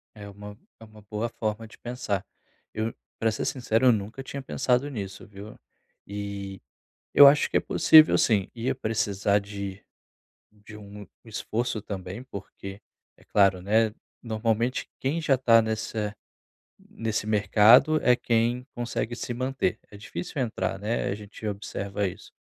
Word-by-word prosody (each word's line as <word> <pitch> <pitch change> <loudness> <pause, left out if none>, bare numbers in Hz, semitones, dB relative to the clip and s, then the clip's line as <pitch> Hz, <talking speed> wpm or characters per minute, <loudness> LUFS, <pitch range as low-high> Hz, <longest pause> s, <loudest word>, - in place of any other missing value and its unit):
É 105 -1 -9
uma 105 +1 -10 0.2
é - - -11
uma 110 -1 -16
boa 105 +3 -3
forma 110 -1 -4
de - - -17
pensar. 120 -6 -3 0.5
Eu, 110 +1 -2 0.2
pra 115 - +2
ser 110 - -3
sincero, 120 -1 +1
eu 125 - +8
nunca 110 +4 -3
tinha 140 +1 -6
pensado 125 +1 0
nisso, 100 -6 -6
viu? 105 +1 -11 0.5
Eh, 100 -1 -5 0.5
eu 145 - +10
acho 145 +2 +3
que - - 0
é - - +5
possível 155 0 +6
sim. 100 -5 +2
Ia 120 +1 -1
precisar 105 -2 0
de 100 -1 -7 0.7
de 105 +1 -14
um 105 -1 -11 0.2
esforço 110 0 -3
também, 95 +2 -6
porque 100 -4 -9 0.4
é - - -21
claro, 100 -2 +3
né? 110 +3 +2 0.3
Normalmente, 115 +2 -1
quem 140 +5 -1
já 140 -4 +3
tá 115 -3 +5
nessa 110 -1 -3 0.6
nesse 110 -2 -4
mercado 110 - +5
é 125 - +5
quem 120 +1 0
consegue 120 -1 -3
se 120 0 -5
manter. 130 +2 -1
É 105 - -11
difícil 100 +5 -5
entrar, 115 -5 -2
né? 105 +4 -2
A - - -1
gente 105 +1 -9
observa 100 0 -3
isso. 95 +3 -11
110 Hz, 150 wpm, -26 LUFS, 100-120 Hz, 0.7 s, eu